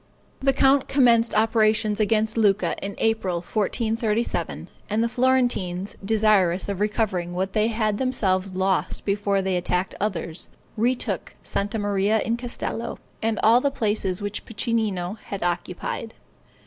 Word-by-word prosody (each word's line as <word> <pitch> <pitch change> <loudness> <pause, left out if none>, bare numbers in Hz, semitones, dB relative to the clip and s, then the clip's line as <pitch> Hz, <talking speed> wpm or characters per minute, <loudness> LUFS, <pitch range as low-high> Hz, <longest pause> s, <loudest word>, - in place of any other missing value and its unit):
The 270 0 +3
count 270 0 +3
commenced 235 -4 +4
operations 215 -1 +2
against 220 +1 +1
Lucca 210 -3 +2
in 200 0 -4
April, 220 -5 0
1437, 220 +4 -1 0.2
and 215 +2 +1
the - - +2
Florentines, 240 -7 +1
desirous 200 -4 +3
of 200 -2 -3
recovering 200 -5 -1
what 190 +1 -2
they 215 0 +2
had 215 -2 0
themselves 195 -7 0
lost 190 0 0
before 200 -1 +1
they 190 -1 0
attacked 180 +1 -1
others, 180 -5 -2 0.3
retook 240 +3 -1
Santa 205 +3 -2
Maria 205 +1 +1
in 230 - 0
Castello, 235 -1 -5 0.2
and 225 -1 0
all 230 +3 +6
the 280 - +2
places 205 -7 -1
which 205 0 -3
Piccinino 210 -4 -2
had 200 -2 -5
occupied. 175 +5 -3
215 Hz, 135 wpm, -24 LUFS, 190-230 Hz, 0.3 s, all